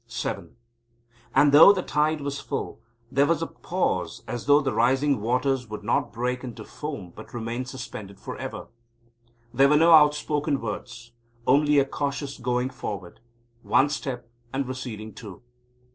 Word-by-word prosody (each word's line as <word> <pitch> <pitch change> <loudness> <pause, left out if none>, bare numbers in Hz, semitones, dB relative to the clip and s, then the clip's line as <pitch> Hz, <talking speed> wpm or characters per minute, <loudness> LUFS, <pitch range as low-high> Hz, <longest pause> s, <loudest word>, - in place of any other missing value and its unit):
VII - - -3 0.9
And, 145 - +6
though 150 +7 +10
the 190 -3 -1
tide 150 +1 0
was 140 0 -3
full, - - -5 0.3
there 140 +1 +3
was 165 -1 +1
a - - 0
pause - - -2
as 120 +1 -5
though 145 0 +7
the 135 -4 -1
rising 130 +3 +2
waters 125 +2 0
would 105 -1 -7
not 110 - 0
break 125 +2 -2
into 120 -3 -8
foam 140 - -7
but 110 - -11
remain 120 +2 -3
suspended 125 -7 -8
for - - -7
ever. - - -7 0.8
There 135 +3 +5
were 150 - +5
no 165 +2 +5
outspoken 150 -1 +4
words, 115 +2 -7 0.3
only 145 +2 +4
a 140 - +5
cautious 140 0 -4
going 125 +1 -1
forward 100 -7 -7 0.4
one 140 +4 +3
step 125 -5 -4 0.2
and 135 -1 -2
receding 120 -4 -6
two. 105 -2 -11
130 Hz, 155 wpm, -25 LUFS, 120-145 Hz, 0.9 s, though